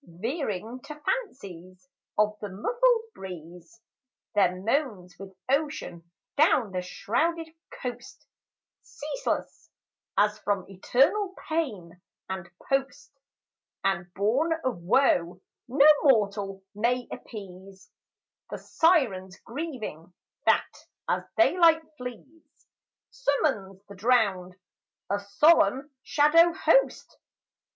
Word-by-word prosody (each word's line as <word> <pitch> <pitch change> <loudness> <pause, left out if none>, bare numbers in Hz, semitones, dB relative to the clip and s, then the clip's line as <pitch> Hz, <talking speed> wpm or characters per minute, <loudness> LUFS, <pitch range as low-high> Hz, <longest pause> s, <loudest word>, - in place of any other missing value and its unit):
Veering 225 - -4
to 300 - -8
fancies 185 - -5 0.3
of 210 0 +2
the 205 - -6
muffled 455 - +1
breeze, 180 +3 -11 0.5
There 185 -3 +2
moans 205 - -2
with 195 -1 -10
ocean 270 - -2 0.3
down 265 - +3
the 185 -1 -2
shrouded 320 - -1 0.2
coast 250 -1 -8 0.6
(Ceaseless, 310 +13 -5 0.5
as 210 +1 +2
from 200 -3 -1
eternal 275 - +1
pain 205 - -3 0.3
and 190 -2 -6 0.2
post, 275 +2 -2 0.7
And 175 -2 -1
born 250 +12 +1
of 255 -8 -2
woe 180 -4 +2 0.3
no 275 +4 +5
mortal 200 -7 +1
may 240 +4 0
appease) 195 -2 -10 0.6
The - - -5
siren's 225 - +1
grieving, 230 - -6 0.4
that, - - +1 0.2
as - - +1 0.2
daylight 335 -1 +5
flees, 275 +6 -11 0.5
Summons 225 - -1
the 200 - -11
drowned, 195 -4 +1 0.6
a 200 - +1
solemn 260 +5 +3
shadow 330 +5 +4
host. - - +1
220 Hz, 95 wpm, -27 LUFS, 190-295 Hz, 0.7 s, no